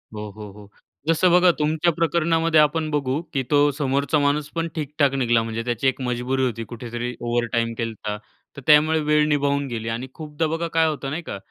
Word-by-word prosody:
हो, 105 Hz, 0 st, -6 dB
हो, 105 Hz, 0 st, -10 dB
हो. 105 Hz, 0 st, -14 dB, 0.4 s
जसं 165 Hz, +2 st, +3 dB
बघा 180 Hz, 0 st, +6 dB
तुमच्या 155 Hz, +3 st, +2 dB
प्रकरणामध्ये, 165 Hz, 0 st, +2 dB
आपण 155 Hz, +1 st, +2 dB
बघू 140 Hz, 0 st, -1 dB
की 135 Hz, -3 st, 0 dB
तो 145 Hz, -, +5 dB
समोरचा 140 Hz, +2 st, 0 dB
माणूसपण 150 Hz, +3 st, 0 dB
ठीक-ठाक 145 Hz, -2 st, 0 dB
निघाला 120 Hz, -4 st, +2 dB
म्हणजे 115 Hz, 0 st, -4 dB
त्याची 120 Hz, +2 st, 0 dB
एक 130 Hz, -, 0 dB
मजबुरी 125 Hz, +1 st, -1 dB
होती. 115 Hz, -2 st, -3 dB
कुठेतरी 120 Hz, +1 st, -5 dB
ओव्हरटाईम 120 Hz, -1 st, -1 dB
केलता, 110 Hz, -2 st, -4 dB, 0.4 s
तर -, -, -7 dB
त्यामुळे 155 Hz, +1 st, +5 dB
वेळ 150 Hz, 0 st, +2 dB
निभावून 140 Hz, -1 st, +1 dB
गेली 115 Hz, -3 st, -4 dB
आणि 115 Hz, +3 st, -4 dB
खूपदा 155 Hz, 0 st, -3 dB
बघा 165 Hz, +2 st, -2 dB
काय 160 Hz, 0 st, +4 dB
होतं, 140 Hz, -3 st, -3 dB
नाही 155 Hz, +5 st, -3 dB
का? 100 Hz, -, -6 dB
140 Hz, 185 wpm, -23 LUFS, 120-155 Hz, 0.4 s, बघा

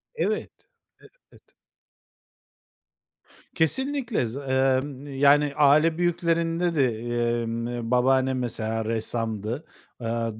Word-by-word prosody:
Evet. -, -, -1 dB, 0.8 s
Evet. -, -, -20 dB, 2.1 s
Kesinlikle, 250 Hz, -, 0 dB
za 135 Hz, +5 st, -7 dB
emm, 130 Hz, +1 st, 0 dB
yani, 145 Hz, 0 st, +4 dB
aile 155 Hz, +3 st, +4 dB
büyüklerinde 170 Hz, 0 st, 0 dB
de, 125 Hz, -7 st, +1 dB, 0.4 s
emm, 115 Hz, +1 st, -4 dB
babaannem 130 Hz, +1 st, +2 dB
mesela 115 Hz, -2 st, -3 dB
ressamdı. 115 Hz, +2 st, -3 dB, 0.3 s
Aaa, 115 Hz, -2 st, -3 dB
130 Hz, 80 wpm, -25 LUFS, 115-160 Hz, 2.1 s, yani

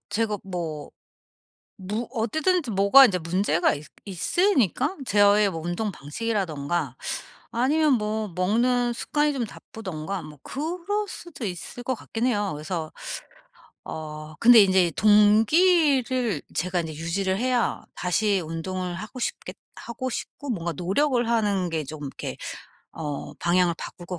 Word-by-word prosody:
제가 210 Hz, 0 st, -1 dB
뭐 165 Hz, -5 st, -5 dB, 0.9 s
무 210 Hz, +5 st, -3 dB
어쨌든지 290 Hz, -, 0 dB
뭐가 200 Hz, +8 st, +7 dB
인제 185 Hz, -6 st, +1 dB
문제가 170 Hz, 0 st, +1 dB
있 145 Hz, +1 st, -9 dB, 0.2 s
있으니까 275 Hz, -, +1 dB
저의 205 Hz, -1 st, +4 dB
뭐 165 Hz, -2 st, -5 dB
운동 175 Hz, +5 st, -2 dB
방식이라든가 165 Hz, -, -2 dB, 0.6 s
아니면 290 Hz, +5 st, +3 dB
뭐 215 Hz, -1 st, -2 dB
먹는 240 Hz, +6 st, +2 dB
습관이 295 Hz, +4 st, 0 dB
좀 255 Hz, -3 st, -1 dB
나쁘던가 195 Hz, -4 st, -6 dB
뭐 150 Hz, -1 st, -12 dB
그럴 320 Hz, +6 st, -4 dB, 0.3 s
수도 330 Hz, -9 st, -9 dB
있을 195 Hz, +5 st, -5 dB
것 260 Hz, 0 st, -1 dB
같긴 230 Hz, +2 st, -3 dB
해요. 205 Hz, -5 st, 0 dB
그래서 155 Hz, +1 st, -4 dB, 0.9 s
어 155 Hz, 0 st, -7 dB
근데 235 Hz, -1 st, +8 dB
인제 185 Hz, -3 st, +3 dB
동기를 245 Hz, -, +4 dB
제가 180 Hz, +1 st, 0 dB
인제 160 Hz, -1 st, -6 dB
유지를 190 Hz, +4 st, -1 dB
해야 250 Hz, +1 st, 0 dB
다시 195 Hz, +3 st, +1 dB
운동을 180 Hz, +2 st, -4 dB
하고 215 Hz, +7 st, -7 dB
싶겠 -, -, -4 dB, 0.2 s
하고 255 Hz, +2 st, -5 dB
싶고 285 Hz, +3 st, -6 dB
뭔가 170 Hz, -7 st, -2 dB
노력을 240 Hz, -, +1 dB
하는 205 Hz, -6 st, +1 dB
게 160 Hz, -2 st, -2 dB
좀 155 Hz, +2 st, -8 dB
이렇게 135 Hz, -, -6 dB, 0.6 s
어 150 Hz, -3 st, -5 dB
방향을 175 Hz, 0 st, +3 dB
바꿀 175 Hz, +1 st, -9 dB
것 180 Hz, -2 st, -5 dB
205 Hz, 270 characters per minute, -25 LUFS, 175-240 Hz, 0.9 s, 근데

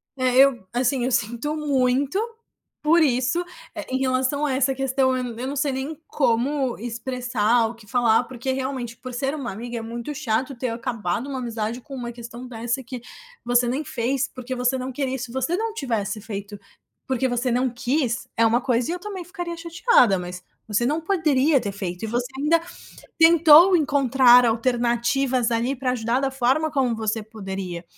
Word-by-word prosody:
É, 255 Hz, -1 st, 0 dB
eu, 265 Hz, -6 st, +5 dB
assim, 250 Hz, 0 st, +1 dB
eu 255 Hz, -, -1 dB
sinto 235 Hz, +8 st, -1 dB
muito 275 Hz, +2 st, +1 dB, 0.6 s
por 330 Hz, +3 st, +4 dB
isso, 255 Hz, +4 st, +1 dB, 0.3 s
eh, -, -, -5 dB
em 260 Hz, -, +1 dB
relação 265 Hz, +2 st, +1 dB
a 275 Hz, -, 0 dB
essa 270 Hz, 0 st, +2 dB
questão, 260 Hz, 0 st, +1 dB
eu 255 Hz, -, -2 dB
n 235 Hz, -1 st, -6 dB
eu 260 Hz, -, -3 dB
não 280 Hz, -, -4 dB
sei 275 Hz, 0 st, 0 dB
nem 280 Hz, +4 st, -4 dB
como 265 Hz, 0 st, 0 dB
expressar 240 Hz, -1 st, 0 dB
ou 220 Hz, -, -5 dB
o -, -, -17 dB
que 225 Hz, -2 st, -17 dB
falar, 240 Hz, 0 st, +3 dB
porque 255 Hz, +2 st, -4 dB
realmente 260 Hz, -3 st, -4 dB
por 255 Hz, +1 st, -9 dB
ser 270 Hz, +4 st, -1 dB
uma 270 Hz, -5 st, -4 dB
amiga, 235 Hz, +4 st, -6 dB
é -, -, -4 dB
muito 235 Hz, +5 st, -6 dB
chato 260 Hz, 0 st, -1 dB
ter 250 Hz, +1 st, -3 dB
acabado 230 Hz, -2 st, -3 dB
uma 270 Hz, -2 st, -3 dB
amizade 230 Hz, 0 st, -3 dB
com 280 Hz, +2 st, -12 dB
uma 240 Hz, -2 st, -5 dB
questão 240 Hz, +1 st, -9 dB
dessa 240 Hz, +2 st, -3 dB
que 250 Hz, 0 st, -7 dB, 0.4 s
você 245 Hz, 0 st, +2 dB
nem 265 Hz, +6 st, -1 dB
fez, 265 Hz, +1 st, -1 dB
porque 255 Hz, 0 st, -5 dB
você 250 Hz, +1 st, +1 dB
não 260 Hz, +1 st, -4 dB
queria, 265 Hz, 0 st, -2 dB
se 245 Hz, -1 st, -6 dB
você 265 Hz, +7 st, -1 dB
não 445 Hz, +1 st, -2 dB
tivesse 225 Hz, -, -2 dB
feito, 205 Hz, -1 st, -7 dB, 0.5 s
porque 260 Hz, 0 st, 0 dB
você 245 Hz, 0 st, -1 dB
não 250 Hz, +2 st, +1 dB
quis, 250 Hz, 0 st, -1 dB
é 230 Hz, -, +4 dB
uma 235 Hz, +2 st, +3 dB
coisa 245 Hz, 0 st, 0 dB
e -, -, -1 dB
eu 360 Hz, -, -5 dB
também 385 Hz, -2 st, -6 dB
ficaria 350 Hz, -1 st, -5 dB
chateada. 335 Hz, -, +3 dB
Mas 180 Hz, 0 st, -7 dB, 0.2 s
você 220 Hz, +3 st, +1 dB
não 300 Hz, +5 st, +1 dB
poderia 310 Hz, -, +2 dB
ter 200 Hz, -3 st, -3 dB
feito, 180 Hz, -2 st, -5 dB
e -, -, -2 dB
você 240 Hz, +1 st, -1 dB
ainda 320 Hz, +4 st, +2 dB, 0.6 s
tentou 335 Hz, +2 st, +7 dB
encontrar 265 Hz, -5 st, +5 dB
alternativas 240 Hz, +2 st, +1 dB
ali 240 Hz, +4 st, 0 dB
pra 255 Hz, 0 st, -1 dB
ajudar 235 Hz, 0 st, 0 dB
da 275 Hz, -, +1 dB
forma 270 Hz, +4 st, +1 dB
como 255 Hz, -5 st, +1 dB
você 220 Hz, 0 st, -1 dB
poderia. 195 Hz, -5 st, -6 dB
255 Hz, 190 wpm, -23 LUFS, 235-275 Hz, 0.6 s, tentou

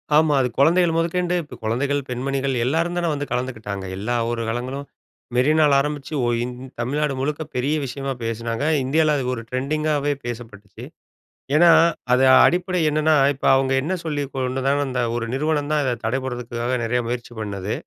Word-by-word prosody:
ஆமா 155 Hz, -1 st, +4 dB
அது 125 Hz, -, +1 dB
குழந்தைகள் 170 Hz, +3 st, +4 dB
முதக்கொண்டு 175 Hz, +2 st, 0 dB
இப்போ 145 Hz, -, -11 dB
குழந்தைகள் 140 Hz, +6 st, 0 dB
பெண்மணிகள் 135 Hz, +1 st, -1 dB
எல்லாரும் 165 Hz, +5 st, 0 dB
தான 170 Hz, -1 st, 0 dB
வந்து 145 Hz, 0 st, -3 dB
கலந்துக்கிட்டாங்க! 110 Hz, -6 st, -4 dB
எல்லா 110 Hz, +5 st, -2 dB, 0.2 s
ஒரு 115 Hz, -1 st, -2 dB
காலங்களும், 130 Hz, +4 st, -4 dB, 0.5 s
மெரினால 150 Hz, +3 st, +4 dB
ஆரம்பிச்சு 150 Hz, 0 st, -4 dB
ஒ -, -, +1 dB
இ -, -, 0 dB, 0.4 s
தமிழ்நாடு 140 Hz, +4 st, -1 dB
முழுக்க 150 Hz, +3 st, -2 dB
பெரிய 140 Hz, +5 st, 0 dB
விஷயமா 135 Hz, +2 st, -4 dB
பேசினாங்க! 115 Hz, +4 st, -2 dB, 0.2 s
இந்தியால 155 Hz, +3 st, +2 dB
அது 135 Hz, -, -2 dB
ஒரு 115 Hz, -2 st, -5 dB
ட்ரெண்டிங்காகவே 145 Hz, +2 st, 0 dB
பேசப்பட்டுச்சு! 115 Hz, -4 st, -8 dB, 0.7 s
ஏன்னா 170 Hz, +1 st, +7 dB, 0.4 s
அது 130 Hz, -, +4 dB, 0.2 s
அடிப்படை 180 Hz, +1 st, +1 dB
என்னென்னா? 155 Hz, +1 st, +2 dB, 0.2 s
இப்போ 135 Hz, -, -3 dB
அவங்க 135 Hz, 0 st, +1 dB
என்ன 170 Hz, +7 st, -2 dB
சொல்லி 145 Hz, -2 st, -1 dB
கொண்டதாலும் 135 Hz, +2 st, 0 dB
அந்த 125 Hz, -1 st, -2 dB, 0.2 s
ஒரு 120 Hz, -1 st, -2 dB
நிறுவனம் 150 Hz, +1 st, 0 dB
தான், 150 Hz, -, +2 dB
இதை 125 Hz, -2 st, 0 dB
தடை 130 Hz, +4 st, 0 dB
படுறதுக்குக்காக 120 Hz, 0 st, -3 dB
நிறைய 125 Hz, +2 st, 0 dB
முயற்சி 120 Hz, 0 st, -4 dB
பண்ணது. 100 Hz, -1 st, -4 dB
135 Hz, 160 wpm, -22 LUFS, 120-150 Hz, 0.7 s, ஏன்னா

